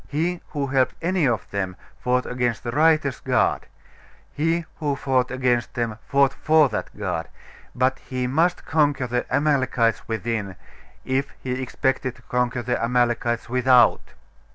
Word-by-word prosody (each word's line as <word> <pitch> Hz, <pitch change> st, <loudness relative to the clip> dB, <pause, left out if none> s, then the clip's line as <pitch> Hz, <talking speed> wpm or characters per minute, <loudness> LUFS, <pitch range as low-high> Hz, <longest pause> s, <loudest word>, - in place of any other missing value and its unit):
He 170 Hz, +4 st, -1 dB
who 145 Hz, -2 st, -3 dB
helped 130 Hz, -1 st, +1 dB
any 175 Hz, -3 st, +2 dB
of 115 Hz, -6 st, -1 dB
them 95 Hz, -2 st, -2 dB, 0.2 s
fought 125 Hz, 0 st, +1 dB
against 125 Hz, -2 st, -1 dB
the 120 Hz, -, -3 dB
righteous 155 Hz, -1 st, +2 dB
God: -, -, +1 dB, 0.7 s
he 165 Hz, +2 st, 0 dB
who 145 Hz, -3 st, -1 dB
fought 130 Hz, -2 st, 0 dB
against 125 Hz, -2 st, 0 dB
them 115 Hz, -3 st, -2 dB
fought 140 Hz, -1 st, +3 dB
for 155 Hz, -1 st, +3 dB
that -, -, -3 dB
God; -, -, -3 dB, 0.5 s
but 130 Hz, +1 st, +1 dB
he 130 Hz, -1 st, -4 dB
must 160 Hz, +8 st, +1 dB
conquer 145 Hz, -4 st, +1 dB
the 125 Hz, 0 st, -2 dB
Amalekites 130 Hz, -7 st, +1 dB
within, 110 Hz, -4 st, -3 dB, 0.5 s
if 135 Hz, +2 st, 0 dB
he 130 Hz, -, -4 dB
expected 130 Hz, 0 st, -1 dB
to 120 Hz, -, -20 dB
conquer 125 Hz, 0 st, -1 dB
the 120 Hz, 0 st, -1 dB
Amalekites 120 Hz, -1 st, +1 dB
without. 125 Hz, -1 st, +3 dB
130 Hz, 145 wpm, -23 LUFS, 120-140 Hz, 0.7 s, fought